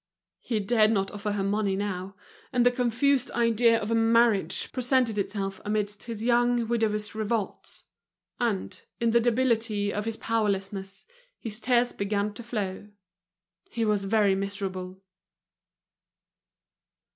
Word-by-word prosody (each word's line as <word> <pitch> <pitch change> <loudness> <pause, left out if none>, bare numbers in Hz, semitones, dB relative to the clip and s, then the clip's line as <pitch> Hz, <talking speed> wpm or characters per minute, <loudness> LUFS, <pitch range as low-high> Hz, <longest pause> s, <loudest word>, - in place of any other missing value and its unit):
He 225 -3 -2
dared 215 +1 +3
not 195 -3 0
offer 205 0 -3
her 200 -1 -1
money 200 0 0
now; 195 -1 -4 0.4
and 245 -2 +2
the 245 - +6
confused 250 +2 +1
idea 230 0 +3
of 215 0 -4
a - - +3
marriage 225 -2 +3
presented 255 -3 +1
itself 195 -1 -3
amidst 210 -1 -2
his 225 -2 -6
young 240 -1 +2
widower's 220 -2 0
revolts. 215 -1 -3 0.6
And, 225 -6 -2 0.2
in 230 -1 +2
the 235 - +5
debility 225 -4 +1
of 210 +1 -2
his 225 -1 -3
powerlessness, 195 -3 -2 0.3
his 215 -1 -6
tears 245 -1 +2
began 200 +1 -1
to 205 - -8
flow. 210 -4 -4 0.8
He 230 -1 -1
was 210 -2 +1
very 205 -1 +3
miserable. 190 -1 -4
215 Hz, 130 wpm, -27 LUFS, 200-235 Hz, 0.8 s, the